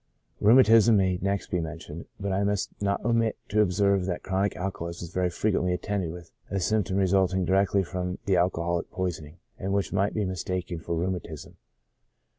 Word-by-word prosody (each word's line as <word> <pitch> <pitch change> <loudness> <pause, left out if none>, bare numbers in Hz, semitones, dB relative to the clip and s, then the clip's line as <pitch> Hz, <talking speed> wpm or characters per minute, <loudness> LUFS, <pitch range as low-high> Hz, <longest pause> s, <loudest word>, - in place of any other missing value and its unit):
Rheumatism 115 -1 +6
may 95 -2 +1
next 100 +1 -2
be 90 - +1
mentioned, 80 0 -7
but 100 -1 -2
I 95 +1 +1
must 100 -1 -1
not 100 0 -1
omit 115 -2 +1
to 105 +1 +3
observe 100 -1 +2
that 90 -2 -3
chronic 95 +1 0
alcoholism 85 -2 -4
is 85 - -13
very 90 -1 +1
frequently 90 -1 0
attended 95 -2 -2
with 85 -1 -10 0.2
a 100 - -1
symp 105 +1 +1
tom 95 - -1
resulting 95 -1 +2
directly 95 +2 +2
from 90 0 -4
the 95 - +2
alcoholic 85 -1 0
poisoning, 85 -4 -4 0.2
and 95 +1 -2
which 100 -1 -1
might 100 +1 +1
be 105 -2 0
mistaken 90 -1 -3
for 85 +1 -3
rheumatism. 85 -3 -4
95 Hz, 175 wpm, -27 LUFS, 90-100 Hz, 0.2 s, Rheumatism